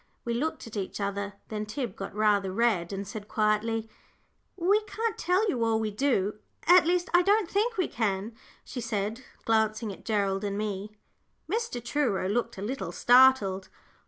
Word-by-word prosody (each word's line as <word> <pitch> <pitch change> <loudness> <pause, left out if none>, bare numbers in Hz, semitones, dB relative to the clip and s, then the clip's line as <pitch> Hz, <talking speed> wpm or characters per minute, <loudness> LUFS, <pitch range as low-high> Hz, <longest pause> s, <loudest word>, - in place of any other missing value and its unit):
We 235 - -1
looked 310 +6 -2
at 230 - -10
each 195 0 -4
other. 200 0 -2 0.2
Then 215 -1 -4
Tib 225 -2 -4
got 195 0 -7
rather 205 -3 +2
red, 200 -5 +1
and 195 0 -4
said, 205 +1 -7
quietly, 220 +1 0 0.7
"We 390 +4 +3
can't 445 +2 -2
tell 370 +5 +1
you 245 - 0
all 225 -1 +2
we 220 -1 -1
do, 210 -4 0 0.3
at 350 -1 +7
least, 355 +1 +2
I 350 - +7
don't 405 +1 +3
think 430 +5 0
we 370 - +1
can," 210 -1 -2 0.3
she 250 - -6
said, 220 +2 -3 0.2
glancing 220 -1 +1
at - - -14
Gerald 200 -2 0
and 200 -1 -2
me. 210 0 -4 0.5
Mr. 405 - -3
Truro 240 -9 0
looked 230 +2 -1
a 190 - -5
little 210 -6 -3
startled. 240 -5 +4
220 Hz, 170 wpm, -28 LUFS, 200-275 Hz, 0.7 s, at